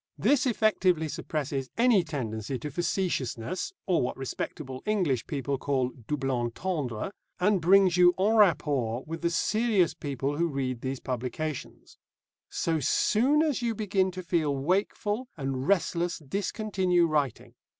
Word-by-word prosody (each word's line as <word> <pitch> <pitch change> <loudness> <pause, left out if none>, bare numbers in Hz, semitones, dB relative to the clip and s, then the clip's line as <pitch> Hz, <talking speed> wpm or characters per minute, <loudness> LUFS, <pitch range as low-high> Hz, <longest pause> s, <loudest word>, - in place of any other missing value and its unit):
This 275 -2 +3
effectually 190 -8 +2
suppresses 140 -3 -3
any 230 -5 +4
tendency 125 -6 -4
to 145 +5 -6
facetiousness, 170 - -2
or 180 -3 +2
what 125 - -2
respectable 135 0 -5
English 175 - +1
people 140 -2 -2
call 130 -3 0 0.2
double 135 -3 -1
entendre, 125 - -2 0.3
and 195 0 +2
brings 185 +1 +5
you 180 0 +6
en 205 +4 +2
rapport 140 - +2
with 165 +1 -6
the 170 - +1
serious 210 -1 +2
people 145 -2 -3
who 170 +1 +2
read 130 -5 -3
these 130 0 -3
publications. 130 +4 -5 0.5
So 165 -1 0
soon 255 - +3
as 295 -6 0
you 235 -2 -1
begin 200 -3 +1
to 185 0 -6
feel 160 -5 0
wakeful 205 - -1
and 135 -2 -3
restless 175 -3 +1
discontinue 185 +2 0
writing. 150 -6 -1
165 Hz, 135 wpm, -28 LUFS, 135-195 Hz, 0.5 s, you